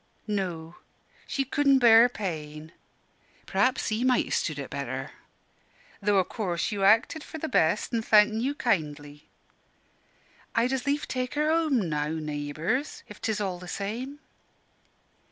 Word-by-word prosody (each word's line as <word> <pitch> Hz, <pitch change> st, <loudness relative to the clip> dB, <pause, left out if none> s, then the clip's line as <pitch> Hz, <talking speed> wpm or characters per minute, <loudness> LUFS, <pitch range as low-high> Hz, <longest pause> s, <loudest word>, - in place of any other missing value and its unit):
"No, 175 Hz, -6 st, -4 dB, 0.5 s
she 275 Hz, -, -1 dB
cudn' 275 Hz, 0 st, +3 dB
bear 235 Hz, -1 st, +7 dB
pain. 155 Hz, -7 st, -6 dB, 0.7 s
P'raps 230 Hz, +7 st, +1 dB
he 220 Hz, +2 st, -1 dB
might 255 Hz, -1 st, +3 dB
ha' -, -, -9 dB
stood 155 Hz, -4 st, -1 dB
it 140 Hz, -2 st, -6 dB
better 135 Hz, 0 st, -4 dB, 0.9 s
though 205 Hz, 0 st, +2 dB
o' 190 Hz, -, +4 dB
course 180 Hz, -3 st, -3 dB
you 200 Hz, -2 st, -2 dB
acted 225 Hz, +10 st, +3 dB
for 320 Hz, -, -8 dB
the 320 Hz, -, -4 dB
best, 185 Hz, -, +1 dB
an' 230 Hz, -, +1 dB
thankin' 215 Hz, 0 st, +4 dB
you 275 Hz, +4 st, -1 dB
kindly. 150 Hz, -, -2 dB, 1.3 s
I'd 245 Hz, +2 st, +2 dB
as 265 Hz, 0 st, -3 dB
lief 290 Hz, +1 st, 0 dB
take 255 Hz, +1 st, -3 dB
her 300 Hz, +1 st, +2 dB
home 305 Hz, -, +1 dB
now, 150 Hz, -1 st, -1 dB
naybours, 160 Hz, -, -3 dB
if -, -, -12 dB
'tis 220 Hz, -2 st, -1 dB
all 190 Hz, -3 st, -3 dB
the 180 Hz, -, -10 dB
same." 230 Hz, +10 st, -4 dB
210 Hz, 145 wpm, -27 LUFS, 160-255 Hz, 1.3 s, bear